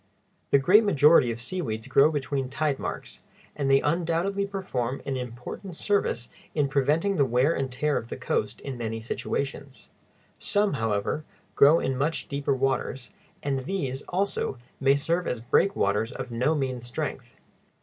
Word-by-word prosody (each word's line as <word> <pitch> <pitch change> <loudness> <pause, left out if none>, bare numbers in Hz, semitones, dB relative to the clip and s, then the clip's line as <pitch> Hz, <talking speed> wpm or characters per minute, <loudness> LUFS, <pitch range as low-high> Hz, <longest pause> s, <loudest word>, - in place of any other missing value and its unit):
The - - +6
great 185 +11 +6
majority 150 - +5
of 115 - -5
seaweeds 120 -6 -3
grow 140 +2 +5
between 140 -3 -2
tide 145 0 -1
marks, - - -6 0.3
and 140 -2 -1
they 135 0 +5
undoubtedly 170 +5 0
perform 135 -11 -3
an 135 - -2
important 125 - -6
service 165 - 0 0.3
in 145 -3 +2
preventing 150 +8 +1
the 145 - +5
wear 130 +5 +2
and 135 -4 -2
tear 150 +3 0
of 115 - -4
the - - -6
coast - - -2
in 135 -3 -6
many 115 -1 -3
situations. 135 +4 -4 0.5
Some, 205 0 +1
however, 110 +3 -1 0.3
grow 150 +4 +6
in 130 - -1
much 150 +5 -1
deeper 140 -1 -1
waters, 130 -1 -1 0.3
and 140 -2 0
these, 135 -3 -3
also, 185 -7 -1 0.2
may 135 0 +4
serve 165 +5 0
as 125 - -1
breakwaters 115 - +1
of 130 -1 -6
no 125 +7 +1
mean 130 -3 -1
strength. 120 +1 -5
140 Hz, 155 wpm, -26 LUFS, 125-165 Hz, 0.5 s, The